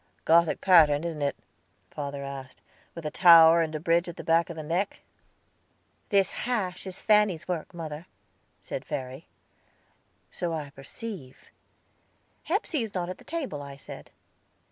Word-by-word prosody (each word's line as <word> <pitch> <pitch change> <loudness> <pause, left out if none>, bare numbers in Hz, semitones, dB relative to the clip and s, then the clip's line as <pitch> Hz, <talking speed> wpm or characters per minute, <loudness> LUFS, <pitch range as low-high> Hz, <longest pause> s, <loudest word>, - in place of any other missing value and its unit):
"Gothic 165 0 +4
pattern, 160 -5 +5
isn't 165 -3 -4
it?" 140 0 0 0.6
father 140 -1 -5
asked, 135 -1 -8 0.4
"with 170 -2 -8
a 150 - -2
tower, 165 -1 +8
and 160 -1 -2
a - - -2
bridge 170 +2 +1
at 170 - -8
the - - -7
back 165 +1 +2
of 170 - -6
the 155 - -6
neck?" 175 +6 -2 1.1
"This 200 -2 +3
hash 200 -7 -3
is 185 0 -6
Fanny's 210 -6 +3
work, 175 -4 -3
mother," 160 -1 -7 0.5
said - - -6
Verry. 130 +4 -6 1.0
"So 170 -2 -3
I 145 -3 -6
perceive." 140 - -9 0.9
"Hepsey 335 - -1
is 220 -3 -5
not 175 -1 -2
at 185 - -7
the - - -15
table," 280 - -4
I 140 -1 -9
said. 135 - -11
165 Hz, 150 wpm, -27 LUFS, 150-185 Hz, 1.1 s, tower